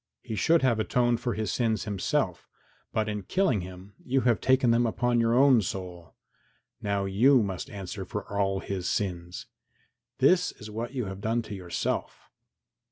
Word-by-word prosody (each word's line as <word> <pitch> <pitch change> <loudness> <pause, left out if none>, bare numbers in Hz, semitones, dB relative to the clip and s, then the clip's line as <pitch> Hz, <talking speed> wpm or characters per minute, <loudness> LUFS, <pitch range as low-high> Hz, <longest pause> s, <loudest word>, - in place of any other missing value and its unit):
He 110 - -5
should 165 +7 +3
have 120 -4 +3
atoned 120 +1 +1
for 120 -1 -2
his 110 -4 -2
sins 110 -4 0
himself, 100 -4 -1 0.4
but 110 -1 0
in 105 -1 -3
killing 170 - +1
him 90 +2 -10
you 130 +1 +1
have 120 -3 +2
taken 130 -2 +3
them 120 +1 +3
upon 120 +1 +1
your 115 0 +2
own 130 -2 +6
soul. 90 -3 -6 0.7
Now 100 -1 -1
you 120 +6 +4
must 95 -3 -4
answer 100 0 -6
for 100 +2 -6
all 95 -1 +1
his 95 -3 -3
sins. 90 -3 -3 0.7
This 180 -1 +3
is 105 0 -10
what 115 +4 -5
you 125 -4 -2
have 95 0 -7
done 115 +2 0
to 110 - -8
yourself. 90 -3 -4
110 Hz, 165 wpm, -28 LUFS, 95-120 Hz, 0.7 s, own